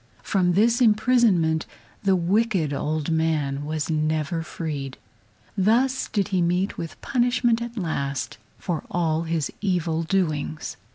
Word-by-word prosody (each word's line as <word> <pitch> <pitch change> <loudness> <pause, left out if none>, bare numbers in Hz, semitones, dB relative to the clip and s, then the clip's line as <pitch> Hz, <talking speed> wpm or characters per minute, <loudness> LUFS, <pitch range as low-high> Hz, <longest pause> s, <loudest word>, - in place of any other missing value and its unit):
From 180 -3 +2
this 230 +6 +3
imprisonment 210 -8 +3 0.3
the 195 -2 +3
wicked 185 -3 +1
old 155 +2 -2
man 155 -3 0
was 155 +1 -2
never 155 +1 0
freed. 145 -5 -5 0.6
Thus 235 +7 +2
did 200 -3 -1
he 185 -3 +1
meet 180 +3 +1
with 165 - -7
punishment 245 -2 +1
at 235 0 -6
last 140 -7 -3 0.2
for 170 -5 -3
all 165 -1 0
his 160 -2 -1
evil 175 -5 0
doings. 160 -4 -1
170 Hz, 125 wpm, -24 LUFS, 155-210 Hz, 0.6 s, this